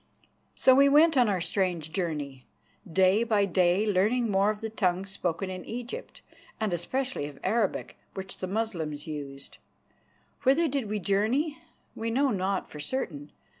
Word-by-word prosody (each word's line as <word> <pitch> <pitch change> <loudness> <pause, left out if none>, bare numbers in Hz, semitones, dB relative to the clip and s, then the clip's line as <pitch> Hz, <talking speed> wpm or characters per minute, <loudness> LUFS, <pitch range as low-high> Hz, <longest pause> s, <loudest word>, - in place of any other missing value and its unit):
So 260 - +5
we 280 +2 +6
went 315 +3 +6
on 245 -4 +4
our 190 -3 0
strange 175 -4 -1
journey, 150 -8 -3 0.4
day 190 +5 +4
by 215 -4 +2
day 185 +2 +2
learning 215 +4 +2
more 195 +1 +3
of 215 -1 -2
the 225 - -4
tongues 190 -2 0
spoken 185 0 -2
in 185 -1 -6
Egypt, 240 +2 -7 0.4
and 215 -4 0
especially 255 - -2
of 145 -2 -11
Arabic, 225 -3 -1 0.2
which 190 0 -6
the 185 - -3
Moslems 175 -8 -2
used. 140 -3 -8 0.8
Whither 285 +5 +4
did 270 -6 -2
we 215 - -1
journey? 225 - 0 0.4
We 225 +1 -3
know 270 +4 +2
not 190 -1 -1
for 150 - -10
certain. 150 - -4
200 Hz, 155 wpm, -28 LUFS, 175-235 Hz, 0.8 s, we